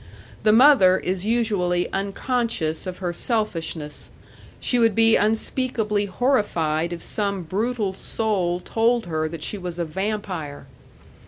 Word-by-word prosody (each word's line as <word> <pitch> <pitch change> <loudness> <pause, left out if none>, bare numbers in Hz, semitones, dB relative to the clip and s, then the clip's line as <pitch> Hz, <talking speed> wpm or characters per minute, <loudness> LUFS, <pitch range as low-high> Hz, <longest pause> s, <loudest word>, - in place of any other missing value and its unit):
The 215 - +4
mother 225 -6 +6
is 185 +2 -3
usually 200 -7 +1
unconscious 195 -4 -1
of 185 - -5
her 175 -2 -3
selfishness; 170 - -3 0.5
she 245 - +2
would 225 -3 +3
be 225 0 +5
unspeakably 215 -1 0
horrified 175 - 0
if 170 -1 -6
some 200 -3 -2
brutal 210 +3 -1
soul 190 -4 -1
told 230 +4 +1
her 155 -2 -2
that 160 -1 -7
she 205 - -3
was 180 -2 -6
a 170 - -1
vampire. 185 -4 -4
195 Hz, 130 wpm, -23 LUFS, 175-225 Hz, 0.5 s, mother